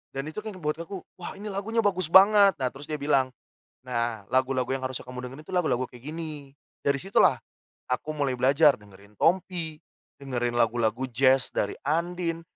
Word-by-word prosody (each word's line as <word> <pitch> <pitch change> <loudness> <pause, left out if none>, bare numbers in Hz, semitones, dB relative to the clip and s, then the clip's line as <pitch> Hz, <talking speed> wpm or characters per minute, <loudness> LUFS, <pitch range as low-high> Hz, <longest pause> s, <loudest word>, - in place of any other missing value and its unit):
dan 135 +2 -3
itu 160 - -5
kaya 215 - -5
ngebuat 160 -1 -3
aku 190 -3 -7 0.2
wah 175 - -6
ini 210 - -6
lagunya 215 +4 -2
bagus 185 -5 +2
banget. 200 -1 +7
Nah 130 - +1
terus 140 +2 -10
dia 150 -2 -3
bilang, 135 -3 +2 0.6
"nah 115 -3 -2
lagu-lagu 130 0 +1
yang 135 0 -1
harusnya 130 0 -5
kamu 125 0 -6
dengerin 140 +4 -10
itu - - -10
lagu-lagu 130 -8 +1
kayak 125 +1 -15
gini". 150 -4 -7 0.3
Dari 140 -1 +1
situ 195 +2 0
lah - - +4 0.5
aku 125 +4 -2
mulai 140 -3 0
belajar 140 +3 +5
dengerin 100 0 -17
Tompi, 170 -3 +1 0.4
dengerin 120 -3 -2
lagu-lagu 115 +1 +1
Jazz 130 +2 +3
dari 100 - -1
Andien, 170 +2 -1
140 Hz, 175 wpm, -27 LUFS, 125-170 Hz, 0.6 s, banget